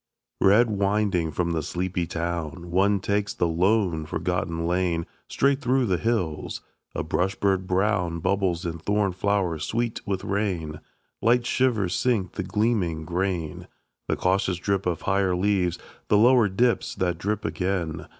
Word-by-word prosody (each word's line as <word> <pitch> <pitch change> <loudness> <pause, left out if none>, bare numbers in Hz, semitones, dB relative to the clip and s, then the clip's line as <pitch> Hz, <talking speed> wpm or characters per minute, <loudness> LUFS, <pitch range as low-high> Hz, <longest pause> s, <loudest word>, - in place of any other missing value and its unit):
Red 110 +4 +5
winding 100 -4 +1
from 85 +2 -1
the 80 -1 0
sleepy 90 +2 -2
town, 85 0 -4
One 100 +3 +3
takes 100 0 -1
the 85 - +1
lone, 85 -2 +1
forgotten 85 -1 -2
lane 85 -1 0 0.2
Straight 140 0 +1
through 130 0 +2
the 90 -5 0
hills. 90 -9 -2 0.3
A - - -1
brush 90 +4 0
bird 95 -2 0
brown 95 -3 +1
Bubbles 90 0 0
in 85 -1 -4
thorn 100 +3 +1
flowers 90 -4 0
sweet 115 +7 -2
with 95 -2 -2
rain; 90 -7 -2 0.4
Light 120 +1 +3
shivers 115 -8 +1
sink 110 -8 0
the - - -4
gleaming 95 -6 0
grain; 90 -2 -2 0.4
The - - +1
cautious 95 -1 +1
drip 95 +1 -1
of 85 -3 -2
higher 95 -2 +1
leaves 90 -2 +1 0.3
The 105 - +4
lower 120 -1 +5
dips 115 +3 +1
that 90 -2 -1
drip 105 +2 -2
again. 90 -4 -2
95 Hz, 150 wpm, -25 LUFS, 85-105 Hz, 0.4 s, Red